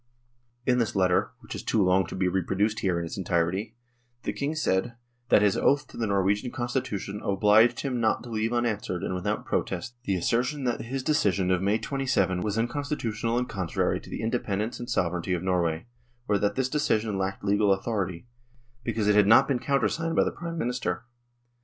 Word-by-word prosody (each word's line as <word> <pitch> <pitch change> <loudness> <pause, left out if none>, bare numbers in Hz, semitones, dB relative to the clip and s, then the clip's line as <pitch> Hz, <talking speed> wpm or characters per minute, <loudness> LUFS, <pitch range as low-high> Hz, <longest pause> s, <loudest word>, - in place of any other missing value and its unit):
In 125 -1 +3
this 115 -3 0
letter, 90 -2 +2
which - - -8
is - - -5
too 110 - +1
long 90 -1 +3
to - - -6
be 95 -1 +1
reproduced 95 +4 0
here 90 -3 0
in 85 - -2
its 85 - -6
entirety, 95 +5 -1 0.5
the - - -2
King 145 +3 -2
said, 120 -5 0 0.2
" 120 0 -44
that 105 - +5
his 100 -2 +3
oath 145 +1 +2
to - - -14
the 115 - -1
Norwegian 100 +4 +1
Constitution 120 -5 -3
obliged 105 +4 +4
him 130 -3 -2
not 110 -1 +1
to 120 - -9
leave 110 +1 -1
unanswered 110 -7 -1
and - - -2
without 90 -1 -2
protest 95 +6 -2
the 100 - +1
assertion 125 - 0
that 120 -2 -1
his 130 +3 -4
decision 100 -11 +2
of 90 -1 +2
May 100 +3 +2
27 115 -10 0
was 105 +2 -2
unconstitutional 120 -2 -1
and 125 0 0
con 95 -4 -3
trary - - 0
to - - -13
the - - -5
independence 110 -1 -2
and 120 0 -6
sovereignty 90 -4 0
of 90 -1 -2
Norway, 85 -2 0 0.4
or 100 - +2
that 100 0 0
this 130 -1 +1
decision 110 -8 0
lacked 95 +1 -3
legal 100 0 +3
authority, 95 -2 -1 0.6
because 115 -3 -1
it 105 - +5
had 105 -1 +5
not 125 +5 +7
been 135 -3 +1
countersigned 165 +5 0
by - - +5
the - - -1
Prime 170 -1 -6
Minister. 125 - -2
105 Hz, 195 wpm, -27 LUFS, 95-120 Hz, 0.6 s, not